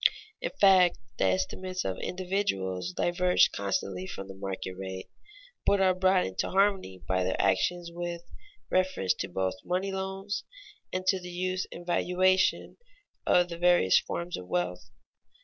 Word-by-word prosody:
In -, -, -1 dB
fact, 185 Hz, -3 st, +6 dB, 0.2 s
the -, -, +3 dB
estimates 185 Hz, -, -1 dB
of 95 Hz, -, -2 dB
individuals 95 Hz, -, -2 dB
diverge 180 Hz, -, +3 dB
constantly 95 Hz, -2 st, -2 dB
from 95 Hz, 0 st, -7 dB
the 95 Hz, -, -8 dB
market 95 Hz, -1 st, -5 dB
rate, 95 Hz, 0 st, -7 dB, 0.5 s
but 200 Hz, -, +3 dB
are 190 Hz, -1 st, +4 dB
brought 185 Hz, 0 st, +3 dB
into 95 Hz, -, -2 dB
harmony 190 Hz, -, +1 dB
by 95 Hz, 0 st, +1 dB
their 95 Hz, -, -1 dB
actions 170 Hz, -, +1 dB
with 175 Hz, 0 st, -4 dB, 0.5 s
reference 185 Hz, -, +2 dB, 0.2 s
both 95 Hz, +4 st, -1 dB
to -, -, -23 dB
money 185 Hz, +2 st, 0 dB
loans 190 Hz, +1 st, -3 dB, 0.5 s
and 185 Hz, 0 st, -3 dB
to 190 Hz, 0 st, +3 dB
the 180 Hz, 0 st, -8 dB
use 185 Hz, +1 st, -2 dB
and 175 Hz, -, -9 dB
valuation 185 Hz, +2 st, +2 dB, 0.5 s
of 180 Hz, 0 st, +4 dB
the 170 Hz, 0 st, -6 dB
various 175 Hz, -, +5 dB
forms 170 Hz, +1 st, -4 dB
of 90 Hz, -, -9 dB
wealth. 90 Hz, +6 st, -2 dB
175 Hz, 150 wpm, -29 LUFS, -, 0.5 s, fact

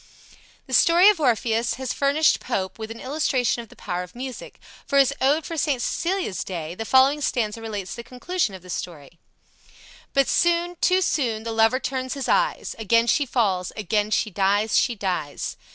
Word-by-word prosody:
The -, -, -9 dB
story 345 Hz, +4 st, +6 dB
of 415 Hz, -5 st, +2 dB
Orpheus 235 Hz, -3 st, +1 dB
has 260 Hz, -1 st, -4 dB
furnished 285 Hz, +3 st, +2 dB
Pope 190 Hz, +2 st, -3 dB
with 220 Hz, 0 st, -6 dB
an 230 Hz, 0 st, -8 dB
illustration 260 Hz, -4 st, 0 dB
of 230 Hz, -, -13 dB
the -, -, -16 dB
power 175 Hz, 0 st, -4 dB
of 180 Hz, +3 st, -10 dB
music, 255 Hz, 0 st, -8 dB, 0.3 s
for 280 Hz, -, +1 dB
his 275 Hz, 0 st, +4 dB
"Ode 290 Hz, +4 st, +2 dB
for 330 Hz, -, -5 dB
St. 290 Hz, -4 st, 0 dB
Cecilia's 345 Hz, -, -2 dB
Day" 170 Hz, -3 st, -5 dB
The 225 Hz, +5 st, -6 dB
following 265 Hz, +5 st, +4 dB
stanza 225 Hz, -5 st, -1 dB
relates 205 Hz, -4 st, -5 dB
the 235 Hz, -, -8 dB
conclusion 250 Hz, -, -2 dB
of 185 Hz, -, -12 dB
the 180 Hz, -, -14 dB
story: 165 Hz, -3 st, -7 dB, 1.0 s
"But 275 Hz, -1 st, +4 dB
soon, 345 Hz, +1 st, +1 dB
too 370 Hz, +1 st, +3 dB
soon 230 Hz, -10 st, -1 dB
the 230 Hz, -, -4 dB
lover 225 Hz, +3 st, +3 dB
turns 260 Hz, 0 st, -3 dB
his 275 Hz, -, -4 dB
eyes; -, -, 0 dB
Again 230 Hz, +2 st, +3 dB
she 275 Hz, +5 st, +1 dB
falls, 195 Hz, -8 st, 0 dB
again 210 Hz, 0 st, 0 dB
she 215 Hz, 0 st, 0 dB
dies, 205 Hz, +3 st, +1 dB
she 240 Hz, -, +2 dB
dies! 180 Hz, -8 st, -3 dB
235 Hz, 185 wpm, -23 LUFS, 210-280 Hz, 1.0 s, story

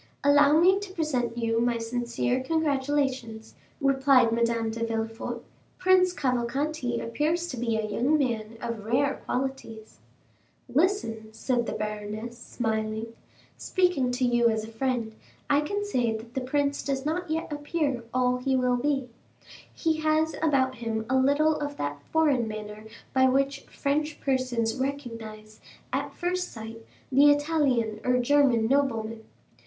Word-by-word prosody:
"Allow 290 Hz, +1 st, +6 dB
me 375 Hz, +3 st, +5 dB
to 400 Hz, -2 st, -8 dB
present 255 Hz, -9 st, -1 dB
you 230 Hz, -1 st, 0 dB
my 240 Hz, 0 st, +1 dB
sincere 240 Hz, +2 st, -1 dB
congratulations," 270 Hz, -6 st, -1 dB, 0.3 s
replied 270 Hz, -4 st, +4 dB
Madame 230 Hz, -1 st, +1 dB
de 230 Hz, +1 st, -4 dB
Villefort. 225 Hz, +1 st, -3 dB, 0.3 s
"Prince 370 Hz, 0 st, +4 dB
Cavalcanti 255 Hz, -2 st, -1 dB
appears 305 Hz, +9 st, -1 dB
to 255 Hz, -, -5 dB
be 230 Hz, -1 st, 0 dB
a 220 Hz, -, -1 dB
young 250 Hz, +8 st, +1 dB
man 230 Hz, -5 st, -2 dB
of 230 Hz, -3 st, -4 dB
rare 265 Hz, +6 st, +1 dB
qualities." 250 Hz, -4 st, -4 dB, 0.7 s
40276m -, -, -14 dB
"Listen," 295 Hz, -, +1 dB
said 240 Hz, +1 st, 0 dB
the -, -, -2 dB
baroness, 215 Hz, +2 st, -4 dB
smiling; 220 Hz, -1 st, -3 dB, 0.4 s
"speaking 360 Hz, -9 st, +1 dB
to 250 Hz, +1 st, 0 dB
you 240 Hz, -1 st, +3 dB
as 220 Hz, -1 st, -1 dB
a 220 Hz, -, -8 dB
friend 230 Hz, -1 st, -2 dB, 0.4 s
I 285 Hz, +1 st, +4 dB
can 405 Hz, +7 st, -2 dB
say 240 Hz, -, 0 dB
that 230 Hz, +2 st, -12 dB
the 265 Hz, -, -2 dB
prince 280 Hz, +2 st, 0 dB
does 275 Hz, -1 st, -2 dB
not 340 Hz, +3 st, -2 dB
yet 320 Hz, -1 st, -2 dB
appear 290 Hz, -4 st, -1 dB
all 250 Hz, 0 st, +2 dB
he 265 Hz, +1 st, 0 dB
will 250 Hz, -1 st, +2 dB
be. 270 Hz, 0 st, 0 dB, 0.6 s
He 320 Hz, -2 st, 0 dB
has 315 Hz, 0 st, +1 dB
about 270 Hz, -5 st, +2 dB
him 225 Hz, -1 st, -3 dB
a -, -, +3 dB
little 285 Hz, +4 st, +3 dB
of 290 Hz, -1 st, -4 dB
that 145 Hz, 0 st, -3 dB
foreign 290 Hz, -7 st, +3 dB
manner 215 Hz, 0 st, -7 dB, 0.3 s
by 260 Hz, 0 st, +5 dB
which 275 Hz, +2 st, 0 dB
French 300 Hz, +2 st, -2 dB
persons 255 Hz, -4 st, 0 dB
recognize, 230 Hz, -6 st, -5 dB, 0.3 s
at -, -, -1 dB
first 360 Hz, 0 st, -2 dB
sight, 225 Hz, 0 st, -9 dB, 0.3 s
the 280 Hz, +3 st, +7 dB
Italian 290 Hz, -7 st, +1 dB
or 250 Hz, 0 st, +2 dB
German 250 Hz, -3 st, +3 dB
nobleman. 230 Hz, -5 st, 0 dB
255 Hz, 145 wpm, -27 LUFS, 230-290 Hz, 0.7 s, the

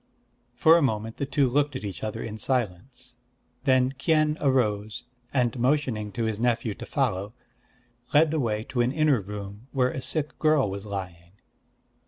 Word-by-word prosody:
For 160 Hz, +7 st, +6 dB
a -, -, +2 dB
moment 110 Hz, -4 st, -1 dB
the 140 Hz, -, -2 dB
two 140 Hz, -1 st, +2 dB
looked 145 Hz, +2 st, +1 dB
at 130 Hz, -, -5 dB
each 100 Hz, -5 st, -6 dB
other 110 Hz, +1 st, -3 dB
in 110 Hz, -1 st, -6 dB
silence. 125 Hz, +2 st, -3 dB, 0.5 s
Then 130 Hz, -1 st, +4 dB
Kien 150 Hz, +2 st, +2 dB
arose, 110 Hz, -6 st, 0 dB, 0.3 s
and 125 Hz, -2 st, 0 dB
motioning 125 Hz, -5 st, 0 dB
to 115 Hz, -, -2 dB
his 110 Hz, -1 st, -1 dB
nephew 120 Hz, -2 st, 0 dB
to -, -, -9 dB
follow, 100 Hz, +5 st, -1 dB, 0.8 s
led 150 Hz, +1 st, +5 dB
the 160 Hz, -, 0 dB
way 110 Hz, -4 st, -1 dB
to 125 Hz, -2 st, 0 dB
an 120 Hz, +1 st, +2 dB
inner 150 Hz, -5 st, +2 dB
room 100 Hz, +3 st, -8 dB
where 130 Hz, -2 st, +2 dB
a 130 Hz, -, -5 dB
sick 150 Hz, +2 st, -2 dB
girl 155 Hz, -9 st, +3 dB
was 100 Hz, +2 st, -6 dB
lying. 90 Hz, -3 st, -7 dB
120 Hz, 170 wpm, -26 LUFS, 105-140 Hz, 0.8 s, For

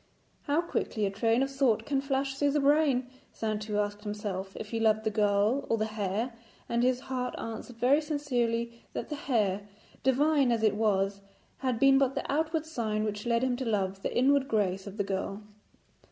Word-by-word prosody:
How 295 Hz, +3 st, +2 dB
quickly 225 Hz, -10 st, -2 dB
a 195 Hz, -, -1 dB
train 225 Hz, +5 st, +2 dB
of 270 Hz, -, -2 dB
thought 250 Hz, -5 st, +2 dB
can 275 Hz, -2 st, 0 dB
flash 270 Hz, 0 st, -1 dB
through 285 Hz, +1 st, +1 dB
the 295 Hz, -, +2 dB
brain! 280 Hz, -3 st, +3 dB, 0.2 s
Saintou 215 Hz, -1 st, -2 dB
asked 205 Hz, 0 st, -1 dB
himself 205 Hz, -2 st, -4 dB
if 215 Hz, -, -7 dB
he 230 Hz, -, -1 dB
loved 220 Hz, -1 st, +3 dB
the 220 Hz, -, 0 dB
girl 210 Hz, +4 st, +2 dB
or 230 Hz, -, +2 dB
the 215 Hz, -, 0 dB
hair, 215 Hz, +2 st, -2 dB, 0.3 s
and 235 Hz, 0 st, 0 dB
his 250 Hz, 0 st, +2 dB
heart 250 Hz, -1 st, -3 dB
answered 225 Hz, +2 st, -6 dB
very 255 Hz, +6 st, +3 dB
sincerely 240 Hz, -6 st, -1 dB
that -, -, -4 dB
the 300 Hz, -, -3 dB
hair, 205 Hz, -8 st, 0 dB, 0.3 s
divine 275 Hz, 0 st, +3 dB
as 230 Hz, -2 st, 0 dB
it 215 Hz, -, +4 dB
was, 200 Hz, -2 st, +1 dB, 0.4 s
had 255 Hz, -3 st, 0 dB
been 270 Hz, +2 st, +6 dB
but 270 Hz, -1 st, +2 dB
the -, -, -2 dB
outward 315 Hz, +2 st, 0 dB
sign 220 Hz, -9 st, -2 dB
which 210 Hz, +1 st, -3 dB
led 235 Hz, +1 st, +2 dB
him 255 Hz, -1 st, +1 dB
to 260 Hz, -, -3 dB
love 195 Hz, -3 st, -1 dB
the -, -, -2 dB
inward 270 Hz, +2 st, +4 dB
grace 195 Hz, -4 st, 0 dB
of 200 Hz, +1 st, -8 dB
the 200 Hz, -, +1 dB
girl. 195 Hz, +1 st, -3 dB
230 Hz, 195 wpm, -29 LUFS, 210-270 Hz, 0.4 s, been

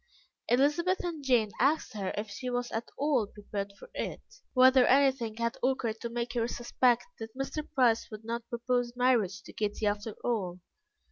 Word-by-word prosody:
Elizabeth 300 Hz, +10 st, +2 dB
and 330 Hz, -5 st, -4 dB
Jane 240 Hz, -6 st, +3 dB
asked 280 Hz, +4 st, +2 dB
her 195 Hz, -3 st, -3 dB
if 210 Hz, +1 st, -2 dB
she 250 Hz, +5 st, -5 dB
was 245 Hz, 0 st, -2 dB
at 225 Hz, +1 st, -3 dB
all 275 Hz, -7 st, +2 dB
prepared 200 Hz, -1 st, -5 dB
for -, -, -12 dB
it, -, -, -3 dB, 0.4 s
whether 255 Hz, 0 st, +7 dB
anything 265 Hz, -5 st, +3 dB
had 235 Hz, +1 st, -2 dB
occurred 235 Hz, -4 st, 0 dB
to 235 Hz, -, -3 dB
make 235 Hz, 0 st, -3 dB
her 235 Hz, -2 st, 0 dB
suspect 240 Hz, 0 st, +1 dB
that 225 Hz, +2 st, -8 dB
Mr. 290 Hz, +3 st, -4 dB
Price 240 Hz, -4 st, +3 dB
would 215 Hz, 0 st, -9 dB
not 235 Hz, 0 st, -4 dB
propose 240 Hz, 0 st, -1 dB
marriage 225 Hz, -6 st, +2 dB
to -, -, -12 dB
Kitty 210 Hz, 0 st, -2 dB
after 205 Hz, +1 st, -1 dB
all. 195 Hz, -7 st, -1 dB
240 Hz, 175 wpm, -30 LUFS, 220-260 Hz, 0.4 s, whether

